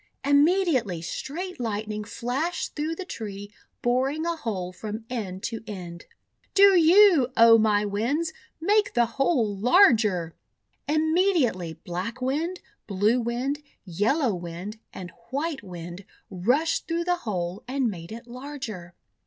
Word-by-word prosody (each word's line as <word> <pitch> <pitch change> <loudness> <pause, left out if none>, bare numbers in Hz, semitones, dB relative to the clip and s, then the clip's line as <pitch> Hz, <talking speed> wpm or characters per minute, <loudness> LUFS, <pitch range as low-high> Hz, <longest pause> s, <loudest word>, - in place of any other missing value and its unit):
Immediately 285 - +2
Straight 330 - -5
Lightning 215 -2 -3
flashed 245 +10 -3
through 315 +2 -2
the 375 - -6
tree, 205 - -7 0.3
boring 265 +6 +1
a 340 0 0
hole 190 - -4
from 215 +3 -6
end 195 -6 -4
to 225 -2 -4
end. 175 -4 -8 0.5
:'Do 395 -1 +7
you, 345 -4 +6
O 230 0 +8
my 210 -1 +2
Winds, 250 +11 -1 0.3
make 415 +5 +2
the 240 -1 +4
hole 235 -3 0
larger!" 215 - +4 0.6
Inimediatelv 310 - +1
Black 185 +8 -4
Wind, 310 +8 -2 0.3
Blue 210 +5 +2
Wind, 250 +5 -2 0.2
Yellow 225 - +1
t/ 185 - -3
x - - -9
Wind, 175 +5 -7
and 180 -2 -8 0.2
White 290 +3 -2
Wind 175 0 -8 0.3
rushed 245 - +1
through 335 0 -1
the 355 0 +1
hole 190 - -4
and 265 0 0
made 170 -4 -6
it 230 +2 -8
larger. 240 -9 -8
235 Hz, 135 wpm, -26 LUFS, 200-310 Hz, 0.6 s, O